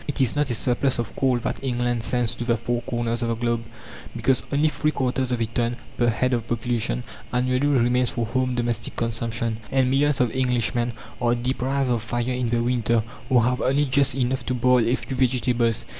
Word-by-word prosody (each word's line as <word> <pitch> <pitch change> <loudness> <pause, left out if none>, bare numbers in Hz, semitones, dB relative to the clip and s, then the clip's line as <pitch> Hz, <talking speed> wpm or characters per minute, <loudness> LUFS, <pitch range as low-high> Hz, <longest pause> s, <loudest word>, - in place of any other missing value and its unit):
It 145 - -3
is 130 -2 +2
not 145 -1 +1
a 120 - 0
surplus 125 +3 0
of 120 - -4
coal 130 -2 +2
that 120 - -4
England 120 -2 0
sends 120 0 0
to 120 - -5
the 120 -1 +1
four 120 +2 -2
corners 120 -1 -2
of 120 - 0
the 115 - 0
globe, 120 0 -1 0.5
because 125 +2 +2
only 145 +2 +3
three 150 0 0
quarters 130 -3 -1
of 125 - 0
a 115 - +1
ton, 120 +2 -1 0.2
per 120 - +2
head 125 +3 +1
of 115 -2 -1
population, 115 - -1 0.3
annually, 125 +2 +1
remains 125 -2 +3
for 120 -2 -2
home 130 +2 0
domestic 120 -1 -2
consumption, 115 -1 -2
and 130 -1 +2
millions 145 +1 +2
of 125 -3 +2
Englishmen 120 -2 0 0.3
are 120 0 +3
deprived 130 +2 -1
of 120 -2 +1
fire 120 +3 -2
in 125 -1 -1
the 115 0 +1
winter, 115 -2 +1 0.3
or 125 -3 +5
have 125 +2 +1
only 140 +3 +2
just 140 -1 +2
enough 130 -1 0
to 125 - 0
boil 125 -1 +3
a 120 - +3
few 120 +2 -6
vegetables. 120 -3 +1
120 Hz, 205 wpm, -24 LUFS, 115-130 Hz, 0.5 s, or